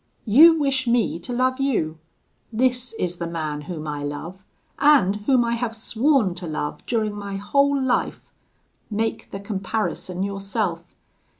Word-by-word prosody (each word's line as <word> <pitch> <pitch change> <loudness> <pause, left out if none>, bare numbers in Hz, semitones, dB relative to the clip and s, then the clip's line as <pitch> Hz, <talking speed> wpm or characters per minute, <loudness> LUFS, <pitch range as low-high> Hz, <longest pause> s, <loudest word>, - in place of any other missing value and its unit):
You 315 +9 +7
wish 275 -4 0
me 235 -7 +1
to 175 - -8
love 255 +2 +1
you: 165 - 0 0.5
this 250 +1 0
is 180 -5 -3
the 170 - -3
man 155 -3 -3
whom 155 0 -6
I 145 -1 -4
love, 165 +6 -6 0.4
and 275 -10 +5
whom 255 -3 +4
I 235 - 0
have 235 -1 -2
sworn 230 - +1
to 175 -1 -5
love 150 -1 -4
during 220 -3 0
my 200 -1 -6
whole 280 +8 +2
life: 260 -2 -1 0.6
make 220 +1 -2
the 195 - -6
comparison 195 -2 -3
yourself. 195 -3 -3
210 Hz, 145 wpm, -23 LUFS, 175-250 Hz, 0.6 s, You